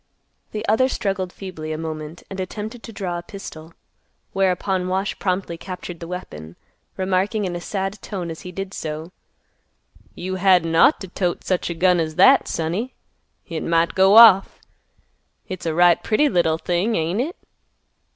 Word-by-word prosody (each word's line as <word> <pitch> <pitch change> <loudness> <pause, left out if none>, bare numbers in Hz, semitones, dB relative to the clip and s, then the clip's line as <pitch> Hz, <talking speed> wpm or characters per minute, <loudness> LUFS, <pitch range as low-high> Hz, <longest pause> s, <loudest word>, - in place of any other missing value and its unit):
The 215 +1 -5
other 225 +5 +3
struggled 195 -6 -2
feebly 170 -6 -7
a 155 - -3
moment 155 0 -6
and 195 - -8
attempted 215 +5 -5
to 230 - -9
draw 180 -5 -4
a - - -7
pistol, 165 -4 -10 0.6
whereupon 185 -1 0
Wash 190 +2 -2
promptly 180 -3 -2
captured 180 -2 -7
the 170 - -7
weapon, 85 - -8 0.4
remarking 195 +3 0
in 180 -2 -3
a 175 - -5
sad 195 +1 -4
tone 180 -5 -5
as 160 - -8
he 180 - -8
did 195 +1 -6
so, 155 +1 -5 1.0
"You 185 +1 -4
hadn't 180 -3 +3
ought 270 - +5
t' 190 - -6
tote 180 -1 -2
such 185 -2 -1
a 170 - -3
gun 180 +1 +3
as 155 -1 -2
that, 265 +10 +6
sonny; 175 +10 -3 0.5
hit 165 -2 -5
might 165 0 +1
go 195 +3 +5
off. 215 -5 +8 0.9
Hit's 185 -2 -6
a 160 - -1
right 175 -1 +5
pretty 260 +7 +2
little 170 - +2
thing, 180 +7 0
ain't 165 +4 -1
hit?" 310 +8 -2
185 Hz, 165 wpm, -22 LUFS, 170-195 Hz, 1.0 s, off